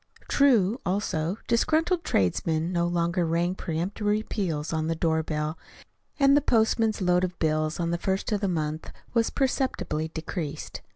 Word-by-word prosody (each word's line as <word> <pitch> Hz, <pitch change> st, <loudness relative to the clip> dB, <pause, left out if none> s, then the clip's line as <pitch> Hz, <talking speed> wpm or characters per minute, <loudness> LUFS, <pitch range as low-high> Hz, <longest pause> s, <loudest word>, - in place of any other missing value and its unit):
True, 245 Hz, -4 st, +3 dB
also, 180 Hz, -2 st, -1 dB
disgruntled 320 Hz, +9 st, +2 dB
tradesmen 160 Hz, -, 0 dB
no 170 Hz, 0 st, +1 dB
longer 175 Hz, +1 st, 0 dB
rang 170 Hz, +2 st, +1 dB
peremptory 200 Hz, +5 st, -1 dB
peals 165 Hz, -9 st, -2 dB
on 155 Hz, 0 st, -1 dB
the 165 Hz, -, 0 dB
doorbell, 160 Hz, -1 st, -1 dB, 0.6 s
and 275 Hz, 0 st, +6 dB
the 290 Hz, -, +4 dB
postman's 220 Hz, -4 st, +2 dB
load 180 Hz, 0 st, +3 dB
of 180 Hz, -1 st, -2 dB
bills 155 Hz, 0 st, 0 dB
on 170 Hz, -1 st, 0 dB
the 170 Hz, -, -1 dB
first 190 Hz, +3 st, -1 dB
of 210 Hz, -1 st, 0 dB
the 200 Hz, -, +1 dB
month 155 Hz, -3 st, -2 dB, 0.2 s
was 230 Hz, -1 st, +2 dB
perceptibly 260 Hz, -, -1 dB
decreased. 160 Hz, -1 st, -5 dB
175 Hz, 150 wpm, -26 LUFS, 160-215 Hz, 0.6 s, and